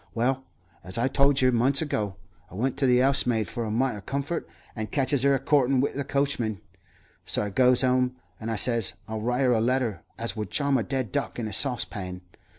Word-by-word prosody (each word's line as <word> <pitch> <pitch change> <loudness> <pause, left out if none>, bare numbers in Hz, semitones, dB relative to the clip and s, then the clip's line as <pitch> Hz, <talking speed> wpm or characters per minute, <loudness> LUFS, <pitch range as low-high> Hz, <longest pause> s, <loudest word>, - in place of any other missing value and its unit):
Well, 130 +3 0 0.4
as 95 +2 -3
I 120 +3 +2
told 140 +1 +3
yer 130 0 +4
months 130 +3 +3
ago, 105 -10 -2 0.3
I - - -12
went 125 +5 -1
to 135 - +2
the 125 0 +4
'ousemaid 125 -5 +2
for 120 - -4
a - - -3
mite 120 +3 0
'o 105 - -8
comfort, 140 - -3 0.3
and 110 -2 -4
catches 140 -1 +1
'er 140 0 +4
a - - -1
courtin' 135 -1 +2
wi' 135 - +1
the 140 - -2
coachman. 130 -7 -1 0.6
So - - 0
I 105 - -4
goes 125 +3 +4
'ome, 125 0 +2 0.2
and 110 - -5
I 115 - -1
says 115 -2 +3
I'll 110 -1 -4
write 125 +4 0
'er 125 - +4
a 110 - +2
letter 120 -6 0 0.2
as 115 0 -1
would 105 -2 -4
charm 140 -2 +1
a - - 0
dead 130 -2 -3
duck 140 -1 -2
in 115 -2 -3
a 105 - -6
saucepan. 100 -7 -2
125 Hz, 220 wpm, -26 LUFS, 110-135 Hz, 0.6 s, yer